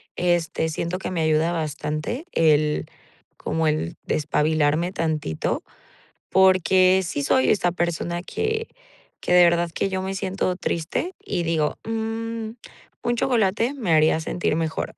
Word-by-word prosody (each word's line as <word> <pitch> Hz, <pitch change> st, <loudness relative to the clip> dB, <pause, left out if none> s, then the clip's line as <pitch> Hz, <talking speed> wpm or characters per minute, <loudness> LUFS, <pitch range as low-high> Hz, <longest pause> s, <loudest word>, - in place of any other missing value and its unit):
este, 175 Hz, -2 st, 0 dB
siento 170 Hz, +3 st, -3 dB
que -, -, -4 dB
me 170 Hz, -3 st, -1 dB
ayuda 155 Hz, +1 st, +2 dB
bastante 155 Hz, -, -3 dB
el, 150 Hz, -2 st, +2 dB, 0.5 s
como 160 Hz, 0 st, -1 dB
el 150 Hz, -, -1 dB
despabilarme 155 Hz, +2 st, +1 dB
tantito. 155 Hz, -, -2 dB, 0.7 s
Porque, 185 Hz, 0 st, +4 dB
sí 145 Hz, -4 st, -3 dB
soy 130 Hz, -2 st, +3 dB
esta 180 Hz, -4 st, +2 dB
persona 175 Hz, 0 st, -2 dB
que 445 Hz, -, -2 dB, 0.5 s
que 180 Hz, -, 0 dB
de 180 Hz, 0 st, +8 dB
verdad 170 Hz, 0 st, +3 dB
que 195 Hz, -, -1 dB
yo 190 Hz, -1 st, -2 dB
me 190 Hz, +1 st, -3 dB
siento 190 Hz, -1 st, -1 dB
triste, 185 Hz, -, -2 dB
y 175 Hz, -3 st, -3 dB
digo: 160 Hz, -2 st, 0 dB
"Mm, 225 Hz, 0 st, -3 dB, 0.5 s
un 240 Hz, 0 st, +1 dB
chocolate 230 Hz, 0 st, +1 dB
me 225 Hz, -11 st, -2 dB
haría 155 Hz, +1 st, +4 dB
sentir 160 Hz, -1 st, -1 dB
mejor". 160 Hz, -1 st, -3 dB
175 Hz, 135 wpm, -23 LUFS, 155-195 Hz, 0.7 s, de